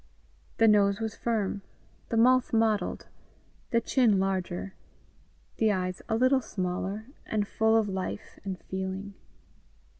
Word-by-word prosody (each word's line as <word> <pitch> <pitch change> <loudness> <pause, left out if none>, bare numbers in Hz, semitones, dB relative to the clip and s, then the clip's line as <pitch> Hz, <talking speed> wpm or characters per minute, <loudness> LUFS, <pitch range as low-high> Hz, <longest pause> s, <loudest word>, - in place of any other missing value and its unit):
The 225 - +5
nose 200 -1 +4
was 220 -2 -3
firm, 210 -4 -1 0.5
the 230 - 0
mouth 250 +2 +4
modelled, 220 -2 +1 0.6
the 230 - +3
chin 235 -3 +3
larger, 190 0 -2 0.8
the 220 -1 +3
eyes 185 -2 -2
a 220 - +2
little 255 +3 +4
smaller, 195 0 -3 0.2
and 210 -2 0
full 220 +1 +3
of 220 -2 +2
life 190 +1 -5
and 190 -2 -4
feeling. 190 +1 -5
205 Hz, 125 wpm, -28 LUFS, 190-225 Hz, 0.8 s, The